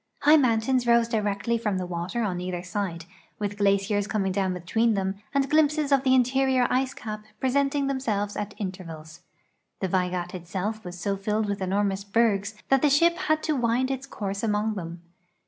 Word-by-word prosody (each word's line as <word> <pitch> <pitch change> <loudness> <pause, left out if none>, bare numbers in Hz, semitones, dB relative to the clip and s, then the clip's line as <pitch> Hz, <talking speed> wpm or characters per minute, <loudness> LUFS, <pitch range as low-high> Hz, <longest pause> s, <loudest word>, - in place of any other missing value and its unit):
High 300 +2 +7
mountains 245 -1 +2
rose 235 -1 +4
directly 215 0 -1
from 210 -4 -1
the 185 - -2
water 175 +6 -3
on 180 -4 -2
either 180 -1 -4
side, 180 -3 -4 0.3
with 205 0 -4
glaciers 200 0 +2
coming 195 -3 0
down 190 -1 0
between 215 +6 +1
them 195 0 -2
and 275 -1 +1
glimpses 300 0 +2
of 275 -2 +5
the 260 -1 +3
interior 260 0 +3
ice 260 +2 0
cap 215 -4 -6 0.2
presenting 275 +2 +1
themselves 220 -7 -1
at 205 -1 -4
intervals. 165 -5 -7 0.6
The 190 - -1
Vaigat 180 -1 -1
itself 190 +5 -4
was 180 0 -8
so 200 +3 -1
filled 210 +2 -1
with 200 -1 -3
enormous 195 +1 0
bergs 205 -1 +1
that 270 -1 +4
the 295 - +4
shiji 335 +5 +4
had 310 -4 0
to 310 - 0
wind 245 +1 +1
its 265 0 -4
course 200 -1 -4
among 215 -1 0
them. 170 -3 -7
210 Hz, 180 wpm, -26 LUFS, 190-255 Hz, 0.6 s, High